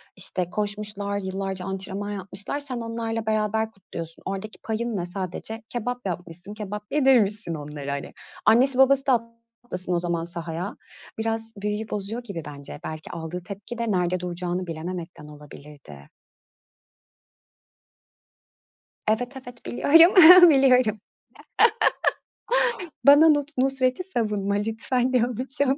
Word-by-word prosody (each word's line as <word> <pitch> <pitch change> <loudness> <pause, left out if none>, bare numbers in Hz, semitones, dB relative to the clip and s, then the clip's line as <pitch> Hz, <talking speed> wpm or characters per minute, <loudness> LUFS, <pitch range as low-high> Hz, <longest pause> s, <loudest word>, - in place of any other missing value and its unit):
işte, 185 -2 -1
koşmuşlar, 205 0 -2
yıllarca 190 -1 -4
antrenman 195 +1 -4
yapmışlar, 200 +6 -4
sen 275 -4 -5
onlarla 230 -1 -3
beraber 220 0 0
kutluyorsun. 165 -4 -9
Oradaki 195 +2 -5
payın 225 0 -2
ne? 175 - -2
Sadece 190 +5 -6
kebap 245 0 -4
yapmışsın, 175 +1 -6
kebap 210 0 -6
yedirmişsin 225 - +2
onlara, 145 -2 -6
hani. 140 0 -5 0.3
Annesi 255 +3 +5
babası 270 +1 +4
da 265 - +5 0.5
atlasın 180 -5 -4
o 175 - +2
zaman 170 -1 -2
sahaya. 170 +3 -5 0.4
Biraz 225 0 -2
büyüyü 210 +2 -3
bozuyor 210 +4 -4
gibi 195 -8 -6
bence, 145 0 -9
belki 155 0 -7
aldığı 170 +1 -6
tepki 200 +5 -8
de 230 -2 -1
nerede 180 -1 +1
duracağını 180 +1 -3
bilememekten 165 -1 -6
olabilirdi. 145 - -13 3.0
Evet, 245 +4 0
evet. 245 -2 -12
Biliyorum, 345 +5 +8
biliyorum. 255 -6 +4 2.1
Bana 290 +3 +8
Nus 290 -2 +3
Nusret'i 260 +4 +1
savunma 210 - -1
lütfen, 225 +4 -1
diyormuşum. 255 +3 +1
210 Hz, 115 wpm, -25 LUFS, 180-245 Hz, 3.0 s, Biliyorum